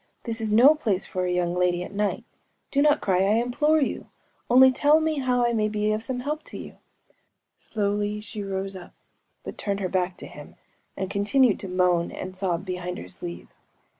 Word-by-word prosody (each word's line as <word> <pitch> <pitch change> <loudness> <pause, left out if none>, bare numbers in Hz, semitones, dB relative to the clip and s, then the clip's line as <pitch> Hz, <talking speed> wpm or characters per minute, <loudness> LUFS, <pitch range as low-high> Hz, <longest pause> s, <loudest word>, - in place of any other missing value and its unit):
This 225 -1 -4
is 220 -1 -2
no 245 +8 +7
place 215 -11 -1
for 185 -1 -3
a 180 - -1
young 175 -1 0
lady 180 0 +1
at 180 - -9
night! 205 +1 -1 0.5
Do 280 - +2
not 295 0 +4
cry, 185 -2 +1
I 195 +2 +3
implore 260 +7 +2
you!‚ÄĒonly 260 -2 +2
tell 295 +4 +4
me 315 -2 0
how 250 -2 +1
I 235 - +1
may 215 -2 +1
be 210 0 0
of 215 0 -1
some 250 +2 -4
help 300 +4 -3
to - - -9
you!‚ÄĚ - - -14 0.4
Slowly 205 0 -2
she 210 0 -7
rose 195 0 -4
up, 180 -2 -11 0.5
but - - -8
turned 200 -1 -2
her 185 -2 -2
back 180 -1 -1
to - - -9
him, - - -12 0.4
and 190 - -2
continued 210 +4 +2
to 195 - -7
moan 180 -2 +1
and 185 0 -7
sob 185 -1 -2
behind 180 -1 -4
her 90 - -8
sleeve. 85 -1 -8
205 Hz, 195 wpm, -25 LUFS, 185-245 Hz, 0.5 s, no